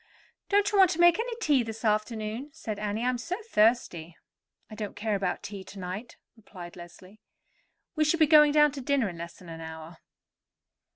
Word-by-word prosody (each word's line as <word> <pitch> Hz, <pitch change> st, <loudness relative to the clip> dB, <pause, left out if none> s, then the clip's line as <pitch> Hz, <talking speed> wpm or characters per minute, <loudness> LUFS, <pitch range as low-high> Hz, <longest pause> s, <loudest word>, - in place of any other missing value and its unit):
"Don't 410 Hz, 0 st, +3 dB
you 410 Hz, -, +2 dB
want 380 Hz, -2 st, +7 dB
to 325 Hz, -, -3 dB
make 345 Hz, +2 st, +6 dB
any 470 Hz, 0 st, -2 dB
tea 295 Hz, -, +3 dB
this 225 Hz, 0 st, -6 dB
afternoon?" 215 Hz, +4 st, -1 dB
said 215 Hz, -2 st, -6 dB
Annie. 210 Hz, +3 st, -2 dB
"I -, -, +1 dB
am 250 Hz, -1 st, -2 dB
so 335 Hz, +9 st, -3 dB
thirsty." 210 Hz, -, +1 dB, 0.5 s
"I -, -, -13 dB
don't 210 Hz, -2 st, -6 dB
care 215 Hz, +1 st, -2 dB
about 195 Hz, -1 st, -2 dB
tea 200 Hz, -2 st, -7 dB
to 200 Hz, -, -12 dB
night," 190 Hz, +5 st, -7 dB, 0.2 s
replied 185 Hz, -6 st, -11 dB
Leslie. 185 Hz, +4 st, -14 dB, 0.7 s
"We 310 Hz, -, +2 dB
shall 310 Hz, +2 st, +1 dB
be 315 Hz, -, +6 dB
going 300 Hz, -1 st, +6 dB
down 300 Hz, 0 st, +5 dB
to 275 Hz, 0 st, -7 dB
dinner 265 Hz, -5 st, +1 dB
in 170 Hz, -2 st, -10 dB
less 170 Hz, 0 st, -7 dB
than 180 Hz, -, -15 dB
an 165 Hz, 0 st, -8 dB
hour." 160 Hz, +1 st, -9 dB
220 Hz, 195 wpm, -28 LUFS, 190-295 Hz, 0.7 s, want